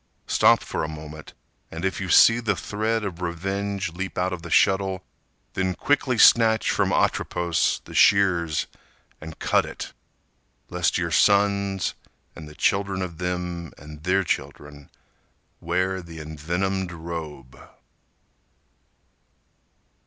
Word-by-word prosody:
Stop -, -, +4 dB
for -, -, -3 dB
a -, -, -2 dB
moment, 80 Hz, 0 st, -10 dB, 0.3 s
and 80 Hz, +3 st, -5 dB
if 95 Hz, -, -2 dB
you 95 Hz, -, -4 dB
see 115 Hz, +7 st, +6 dB
The 105 Hz, -4 st, 0 dB
thread 110 Hz, +5 st, -2 dB
of 90 Hz, -3 st, -5 dB
revenge 95 Hz, +1 st, -3 dB
leap 95 Hz, +2 st, -5 dB
out 90 Hz, +1 st, 0 dB
of 90 Hz, -, -6 dB
the 85 Hz, -, -9 dB
shuttle 95 Hz, +1 st, +2 dB, 0.5 s
Then 95 Hz, -1 st, -1 dB
quickly 135 Hz, -1 st, +1 dB
snatch 110 Hz, -1 st, +5 dB
from -, -, +1 dB
Atropos 85 Hz, -2 st, 0 dB
The -, -, -11 dB
shears 90 Hz, -6 st, +3 dB, 0.6 s
and 80 Hz, 0 st, -9 dB
cut -, -, +2 dB
it, -, -, -8 dB, 0.8 s
lest 90 Hz, -1 st, +1 dB
your 85 Hz, -2 st, -2 dB
sons 100 Hz, +1 st, +2 dB, 0.4 s
And 80 Hz, -2 st, -10 dB
the 75 Hz, -, -14 dB
children 100 Hz, -2 st, 0 dB
of 85 Hz, -3 st, -7 dB
them 90 Hz, -2 st, -4 dB
and 75 Hz, 0 st, -12 dB
their 95 Hz, +4 st, +1 dB
children 75 Hz, -4 st, -5 dB, 0.7 s
Wear 95 Hz, +2 st, -1 dB
the 85 Hz, -1 st, -11 dB
envenomed 85 Hz, +5 st, -3 dB
robe. 80 Hz, -6 st, -8 dB
90 Hz, 125 wpm, -24 LUFS, 80-95 Hz, 0.8 s, see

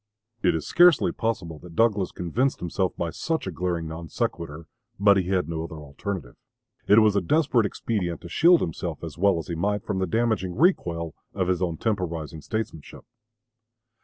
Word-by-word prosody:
It -, -, +3 dB
is 80 Hz, -, -3 dB
scarcely 175 Hz, -3 st, +5 dB
possible 90 Hz, -9 st, -3 dB
that 85 Hz, 0 st, -13 dB
Douglas 105 Hz, -4 st, +2 dB
convinced 115 Hz, +11 st, 0 dB
himself 90 Hz, +2 st, -1 dB
by 85 Hz, -1 st, -2 dB
such 160 Hz, -, -2 dB
a 95 Hz, -, -3 dB
glaring 85 Hz, 0 st, -2 dB
non 80 Hz, +1 st, -7 dB
sequitur; 80 Hz, 0 st, -3 dB, 0.3 s
but 100 Hz, 0 st, +6 dB
he 95 Hz, -2 st, 0 dB
had 95 Hz, -4 st, +1 dB
no 80 Hz, -1 st, -3 dB
other 80 Hz, -, -8 dB
alternative. 75 Hz, -, -6 dB, 0.5 s
It 105 Hz, -, +6 dB
was 110 Hz, -2 st, +5 dB
a 100 Hz, -, +3 dB
desperate 125 Hz, -, +2 dB
expedient 95 Hz, -5 st, -3 dB
to -, -, -9 dB
shield 170 Hz, -, +5 dB
himself 80 Hz, -, -4 dB
as -, -, -7 dB
well 100 Hz, -1 st, +4 dB
as 80 Hz, -, -4 dB
he 85 Hz, -, -5 dB
might 100 Hz, +4 st, -1 dB
from 95 Hz, -, -2 dB
the 95 Hz, -, 0 dB
damaging 110 Hz, -6 st, 0 dB
recoil 85 Hz, -, +1 dB, 0.2 s
of 95 Hz, -2 st, 0 dB
his 90 Hz, -1 st, +1 dB
own 85 Hz, -3 st, -1 dB
temporizing 85 Hz, -8 st, -2 dB
statesmanship. 110 Hz, -4 st, -5 dB
90 Hz, 180 wpm, -25 LUFS, 85-110 Hz, 0.5 s, but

